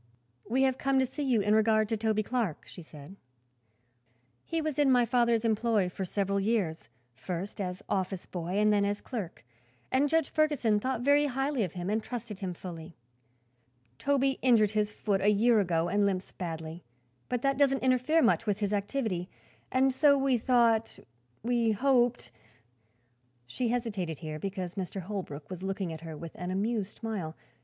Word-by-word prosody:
"We 260 +4 +2
have 265 -1 +1
come 275 -1 +1
to 265 - +4
see 265 +4 -6
you 255 -6 +2
in 210 +1 +2
regard 215 0 +3
to 225 - +1
Toby 215 0 0
Clark," 220 -8 -2
she - - -10
said. 155 +3 -12 1.3
"He 330 - -2
was 310 -3 -2
in 285 -2 +4
my 245 -2 +5
father's 235 -1 +2
employ 220 -3 +2
for 190 +2 -4
several 200 +1 -1
years, 195 -6 -1 0.2
first 180 - -5
as 185 +1 -4
office 190 -1 -2
boy 175 +1 -4
and 210 0 +4
then 205 -1 +3
as 205 0 -1
clerk, 205 - -6 0.5
and 275 +3 +3
Judge 320 -1 +1
Ferguson 280 -9 +2
thought 255 +1 -2
very 285 +3 +4
highly 270 0 -1
of 180 - -4
him 180 -1 -5
and 220 +1 +1
trusted 230 -4 -6
him 185 -3 -4
fully. 165 -2 -9 1.0
Toby 275 -1 +1
injured 225 -5 +4
his 210 -1 +1
foot 205 -2 -1
a 205 - +4
year 220 +2 +4
ago 170 -4 +1
and 205 +3 +1
limps 190 -2 -1
badly, 165 -1 -6 0.5
but 245 -1 -2
that 275 0 +1
doesn't 270 -2 +3
interfere 260 +5 +3
much 230 -1 +2
with 205 -2 +1
his 205 -1 -1
activity, 205 -4 -2 0.4
and 265 +1 +3
so 280 +1 +5
we 270 -1 +2
thought 230 -2 +2 0.5
we 235 -2 +2
hoped 240 - +2 0.6
" 120 +1 -42
She 235 - -2
hesitated, 210 - -2
here, 155 -2 -6
because 185 -1 -4
Mr. 195 -1 -4
Holbrook 175 -7 -6
was 185 -1 -6
looking 190 -3 -3
at 160 - -8
her 160 -2 -7
with 165 +1 -8
an 180 0 -6
amused 205 +1 -2
smile. 195 -9 -4
210 Hz, 175 wpm, -29 LUFS, 185-245 Hz, 1.3 s, my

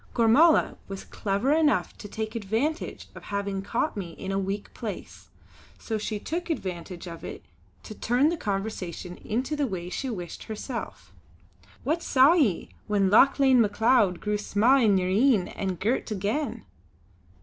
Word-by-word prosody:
Gormala 260 +8 +5
was 195 -1 -6
clever 205 +8 0
enough 300 - +2
to - - -8
take 220 +1 -5
advantage 230 - -2
of - - -12
having 200 -1 -2
caught 230 +9 -1
me 180 -5 -5
in 190 +3 -6
a 195 - 0
weak 195 +1 -4
place; - - -7 0.5
so 220 -2 -3
she 210 0 -3
took 335 +10 -4
advantage 180 - -4
of 170 -2 -9
it - - -8 0.4
to - - -8
turn 245 +7 +2
the 340 - -1
conversation 195 - -4
into 255 +7 -2
the 290 -2 0
way 180 -4 -5
she 265 - -3
wished 180 -7 -6
herself: 230 +3 -6 0.7
"What 320 +4 0
saw 270 +2 +5
ye, 265 - +1 0.2
when 200 -2 +2
Lauchlane 265 +2 +6
Macleod 215 -3 +3
grew 210 0 -1
sma' 220 +6 +3
in 210 -6 +4
yer 185 - 0
een, 210 0 +3
and 190 -3 -4
girt 235 +5 0
again?" 215 - -2
215 Hz, 155 wpm, -26 LUFS, 195-260 Hz, 0.7 s, Lauchlane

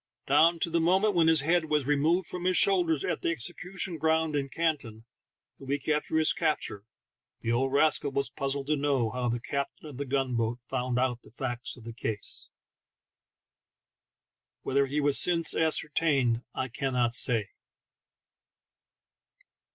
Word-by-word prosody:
Down 160 +5 +4
to 165 - 0
the 170 - +2
moment 190 +5 +3
when 170 -2 +3
his 160 -3 +5
head 165 +3 +1
was 150 -3 0
removed 155 +5 +1
from 180 0 -5
his 185 0 +2
shoulders 175 -7 +3
at - - -2
the - - 0
Execution 175 +4 -4
Ground 160 0 +1
in 140 -1 -2
Canton, 140 -9 -2 0.5
a - - -13
week 140 +1 -3
after 150 +1 0
his 160 0 +4
capture, 155 - -2 0.5
the 115 - -1
old 130 +3 +1
rascal 145 0 +2
was 140 0 -1
puzzled 135 0 -2
to 155 +2 +1
know 140 -6 0
how 125 -1 -2
the 120 +1 -1
captain 140 +5 -5
of 145 -4 -10
the 140 - -3
gun 135 -1 -1
boat 115 +1 -1
found 125 0 -2
out 125 -1 0
the - - -18
facts 120 0 -5
in 120 - -14
the 115 0 -8
case. 110 -2 -2 2.1
Whether 140 +1 +1
he 140 +3 -4
has 145 -1 +4
since 170 -2 +3
ascertained 150 -6 +2
I 130 - -2
cannot 125 -2 -1
say. 115 -5 +1
140 Hz, 160 wpm, -28 LUFS, 125-160 Hz, 2.1 s, his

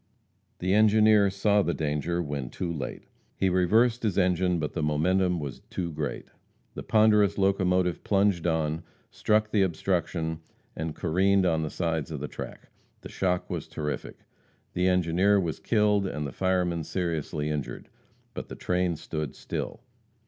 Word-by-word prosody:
The 95 +1 0
engineer 105 -1 +5
saw 100 +2 +2
the 85 -3 -1
danger 80 +3 -1
when 70 -5 -4
too 85 +4 -4
late. 70 -5 -5 0.3
He 95 - +1
reversed 110 +7 +3
his 105 -5 -1
engine, 90 -1 +2
but 75 -2 -3
the 85 - -2
momentum 90 +4 +1
was 70 -4 -6
too 85 -2 -3
great. 75 - -4 0.5
The - - -6
ponderous 105 -2 +4
locomotive 95 -2 +1
plunged 100 -4 +2
on, 80 -1 0 0.3
struck 110 0 +1
the 105 - +3
obstruction, 85 -2 -1 0.4
and 80 -1 -4
careened 95 +3 +2
on 80 -3 +2
the 80 - -2
side 80 -3 -2
of 75 -3 -5
the 75 - -4
track. - - -9 0.3
The - - -9
shock 90 -2 -1
was - - -4
terrific. 75 -1 -5 0.6
The 90 +1 +1
engineer 90 +3 +3
was 85 -4 -2
killed 105 -3 +2
and 75 -5 -4
the 70 - -4
fireman 90 -2 0
seriously 80 -3 -2
injured. 75 -3 -4 0.5
But - - -7
the - - -7
train 90 -1 0
stood 75 -2 -5
still. - - -5
90 Hz, 155 wpm, -27 LUFS, 80-100 Hz, 0.6 s, engineer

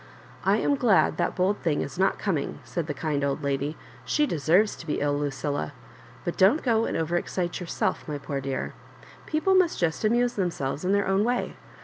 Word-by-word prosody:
I - - +3
am - - +1
so - - +4
glad 230 -7 +3
that - - 0
bold 190 +3 +1
thing 155 -4 0
is 160 - -5
not 195 - +3
coming," 165 -9 -2
said 170 -3 -4
the - - -2
kind 145 -1 -1
old 140 +1 -1
lady; 140 +2 -1 0.3
"she 300 - +2
deserves 175 - +2
to 170 - -10
b^ 150 - 0
ill, 145 0 +1
Lucilla. 145 - -2 0.5
But 175 - -2
don't 205 +12 +5
go 230 -3 +2
and - - -2
over 165 +2 0
excite 175 0 -2
yourself, 175 -2 -2
my 150 -2 -3
poor 140 -1 -4
dear. 135 -1 -3 0.5
People 320 +5 +2
must 370 -3 +3
just 165 +2 0
amuse 240 +3 +2
them 190 -5 0
selves 140 -1 -4
in 185 - +1
their 200 0 +2
own 195 +1 +3
way. 245 +2 -1
175 Hz, 210 wpm, -26 LUFS, 145-210 Hz, 0.5 s, don't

